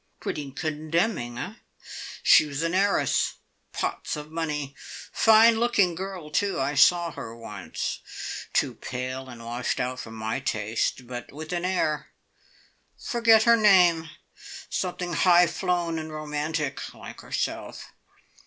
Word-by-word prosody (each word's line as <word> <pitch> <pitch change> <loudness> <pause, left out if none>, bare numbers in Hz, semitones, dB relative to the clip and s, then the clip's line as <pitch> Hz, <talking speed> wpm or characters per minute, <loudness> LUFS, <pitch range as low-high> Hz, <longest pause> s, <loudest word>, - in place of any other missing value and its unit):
"Pretty 145 -2 -4
condemning, 155 - -1
eh? 190 - -5 0.7
She 155 - +7
was 145 +2 -3
an 165 +1 0
heiress 200 +2 +2 0.4
pots - - -3
of 150 0 -8
money. 150 -4 -3 0.4
Fine 225 +1 +6
looking 225 -7 +3
girl, 180 -3 -6
too. 195 +3 0
I 135 +2 0
saw 170 +4 +5
her 115 -5 -8
once. 115 -1 -5 0.5
Too - - +1
pale 130 +1 -5
and 115 -2 -10
washed 120 +3 -2
out 125 0 -2
for 115 - -7
my 110 +2 -3
taste, 115 0 -1
but 120 0 -7
with 155 +4 -7
an 175 0 -1
air. 155 -5 0 0.9
Forget 230 -3 +4
her 235 0 +6
name 180 -7 +5 0.6
something 180 -1 -2
high 175 0 +6
flown 170 -1 -1
and 160 0 -6
romantic, 150 -1 -3
like - - -10
herself. - - -4
155 Hz, 130 wpm, -26 LUFS, 135-180 Hz, 0.9 s, She